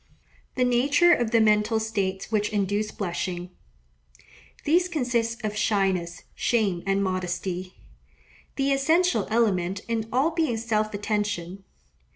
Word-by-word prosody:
The 255 Hz, -, +2 dB
Nature 280 Hz, +8 st, +4 dB
of 240 Hz, -2 st, +1 dB
the 230 Hz, 0 st, +3 dB
Mental 215 Hz, +1 st, +3 dB
States 200 Hz, -3 st, -3 dB
which 210 Hz, -1 st, +1 dB
induce 205 Hz, 0 st, -1 dB
Blushing.—These 175 Hz, -, -5 dB
consist 240 Hz, -7 st, -1 dB
of 210 Hz, -1 st, -2 dB
shyness, 190 Hz, -6 st, 0 dB
shame, 205 Hz, -7 st, 0 dB
and 195 Hz, 0 st, +1 dB
modesty; 185 Hz, 0 st, -3 dB, 0.8 s
the 275 Hz, 0 st, +1 dB
essential 310 Hz, -, +2 dB
element 200 Hz, -4 st, +1 dB
in 225 Hz, -1 st, -2 dB
all 270 Hz, +7 st, +2 dB
being 320 Hz, -8 st, 0 dB
self 215 Hz, -1 st, -1 dB
attention. 205 Hz, -3 st, -3 dB
210 Hz, 115 wpm, -25 LUFS, 185-235 Hz, 0.8 s, Nature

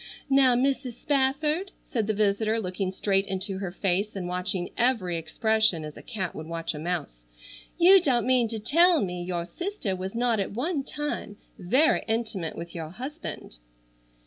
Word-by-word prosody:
"Now, 265 Hz, -2 st, +6 dB
Mrs. 260 Hz, 0 st, 0 dB
Spafford," 295 Hz, -, +1 dB, 0.2 s
said 225 Hz, -5 st, 0 dB
the 215 Hz, -, 0 dB
visitor, 215 Hz, +2 st, +1 dB
looking 185 Hz, -1 st, -2 dB
straight 195 Hz, 0 st, +1 dB
into 190 Hz, 0 st, -3 dB
her 195 Hz, -2 st, -3 dB
face 195 Hz, +3 st, 0 dB
and 185 Hz, -2 st, -4 dB
watching 180 Hz, 0 st, -2 dB
every 230 Hz, -8 st, +1 dB
expression 215 Hz, 0 st, +1 dB
as 150 Hz, -, -8 dB
a -, -, -10 dB
cat 195 Hz, -7 st, -4 dB
would 155 Hz, -, -7 dB
watch 165 Hz, 0 st, -3 dB
a 150 Hz, -, -6 dB
mouse, 155 Hz, -, -4 dB, 0.5 s
"you 375 Hz, +2 st, +7 dB
don't 255 Hz, -8 st, +2 dB
mean 250 Hz, -2 st, +3 dB
to 225 Hz, 0 st, -4 dB
tell 330 Hz, -, +4 dB
me 180 Hz, -1 st, -5 dB
your 175 Hz, -1 st, -3 dB
sister 345 Hz, -, -3 dB
was 190 Hz, +3 st, -5 dB
not 235 Hz, -2 st, +2 dB
at 195 Hz, -, -2 dB
one 280 Hz, -, -1 dB
time 295 Hz, -8 st, -4 dB, 0.2 s
very 275 Hz, -, +3 dB
intimate 220 Hz, -7 st, -2 dB
with 170 Hz, 0 st, -7 dB
your 160 Hz, -2 st, -5 dB
husband." 255 Hz, -, -7 dB
215 Hz, 170 wpm, -27 LUFS, 180-260 Hz, 0.5 s, you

